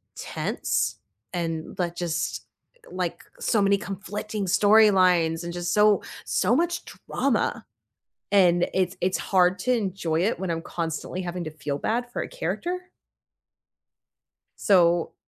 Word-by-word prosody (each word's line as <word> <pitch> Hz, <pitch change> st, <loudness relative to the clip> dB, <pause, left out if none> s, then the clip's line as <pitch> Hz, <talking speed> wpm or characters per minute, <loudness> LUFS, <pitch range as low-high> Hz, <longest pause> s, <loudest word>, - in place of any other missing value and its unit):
tense -, -, -2 dB, 0.4 s
and 165 Hz, -2 st, -3 dB
like, 175 Hz, -1 st, -1 dB
just, 170 Hz, -2 st, -2 dB, 0.4 s
eh, -, -, -16 dB
like, 180 Hz, -2 st, -3 dB, 0.2 s
so 215 Hz, -3 st, +1 dB
many 200 Hz, 0 st, +4 dB
conflicting 205 Hz, +1 st, -5 dB
storylines 185 Hz, -5 st, +4 dB
and 170 Hz, 0 st, -5 dB
just 175 Hz, 0 st, -2 dB
so, 210 Hz, -1 st, +5 dB, 0.2 s
so 210 Hz, +7 st, +2 dB
much 345 Hz, +2 st, 0 dB, 0.3 s
drama. -, -, 0 dB, 0.7 s
And 175 Hz, -3 st, +5 dB
it's 185 Hz, 0 st, 0 dB
it's 185 Hz, +1 st, +1 dB
hard 185 Hz, -1 st, +3 dB
to 255 Hz, -, +1 dB
enjoy 185 Hz, -7 st, 0 dB
it 220 Hz, +5 st, 0 dB
when 190 Hz, -3 st, -2 dB
I'm 165 Hz, 0 st, -1 dB
constantly 170 Hz, +2 st, -4 dB
having 175 Hz, -1 st, -4 dB
to 155 Hz, -, -5 dB
feel 145 Hz, -1 st, -4 dB
bad 240 Hz, -, -1 dB
for -, -, -2 dB
a -, -, -5 dB
character. 365 Hz, -7 st, -3 dB, 1.8 s
So 175 Hz, -3 st, +3 dB
185 Hz, 135 wpm, -25 LUFS, 170-210 Hz, 1.8 s, so